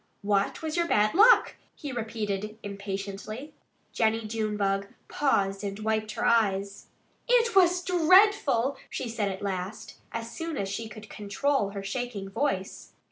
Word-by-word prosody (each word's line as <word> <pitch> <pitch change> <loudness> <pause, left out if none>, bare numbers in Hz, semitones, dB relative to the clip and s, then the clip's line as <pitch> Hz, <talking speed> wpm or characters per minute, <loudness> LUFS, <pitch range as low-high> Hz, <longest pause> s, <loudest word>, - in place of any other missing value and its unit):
"What 200 +7 0
was 315 +1 -2
your 340 0 +2
bad 210 -5 +3
luck?" 445 +7 +6 0.2
he 290 -3 -6
repeated 215 -3 -3
impatiently. 200 +5 -6 0.4
Jennie 225 0 +1
Junebug 210 -3 -1 0.2
paused 195 -8 0
and 200 -1 -4
wiped 215 0 -1
her - - -2
eyes. 200 -3 +1 0.4
"It 470 -2 +3
was 360 -1 +5
dreadful!" 350 - +4
she 255 - -4
said 225 -3 -1
at 190 +1 -6
last, 190 +1 -5
as 230 0 -5
soon 330 -2 -4
as 195 - -2
she 220 +3 -4
could 215 0 -11
control 210 +3 -1
her 200 0 -6
shaking 200 -2 -4
voice. 195 -6 -3
215 Hz, 140 wpm, -28 LUFS, 200-280 Hz, 0.4 s, luck